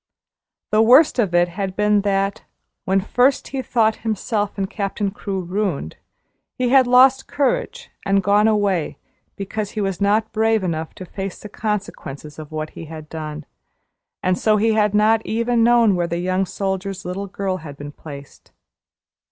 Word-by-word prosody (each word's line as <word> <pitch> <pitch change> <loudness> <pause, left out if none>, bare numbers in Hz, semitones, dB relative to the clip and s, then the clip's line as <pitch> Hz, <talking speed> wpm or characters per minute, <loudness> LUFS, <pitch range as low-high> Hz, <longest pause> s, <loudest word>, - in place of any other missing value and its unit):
The 215 - +4
worst 255 +5 +6
of 195 -7 +1
it 175 0 +4
had 190 +1 -4
been 210 0 +3
that, 195 0 0 0.4
when 190 +1 +2
first 250 +7 +1
he 270 -1 -3
thought 225 -3 +1
himself 215 -1 -2
and 195 -1 -1
Captain 200 0 -3
Crewe 195 -1 -4
ruined, 180 - -2 0.6
he 250 -1 +1
had 260 -1 +5
lost 260 +2 +5
courage 485 - -1
and 195 0 +2
gone 205 +2 +4
away 200 -6 0 0.4
because 200 +1 -4
he - - +1
was 195 -3 -2
not 210 +2 +2
brave 220 -1 +1
enough 160 -3 -3
to 185 - -8
face 195 +1 -6
the 210 - -10
consequences 190 -9 -5
of 155 -1 -9
what 155 0 -4
he 165 - -9
had 155 -1 -10
done, 155 -1 -6 0.8
and 185 0 +1
so 215 -1 +3
he 220 +2 +2
had 210 -1 +2
not 220 +1 +3
even 230 +1 +1
known 235 -3 +5
where 175 -1 0
the 170 - -2
young 185 +2 0
soldier's 195 0 -3
little 190 +3 -4
girl 190 -1 -3
had 150 -5 -10
been 145 0 -8
placed. 140 -2 -12
200 Hz, 170 wpm, -21 LUFS, 180-220 Hz, 0.8 s, worst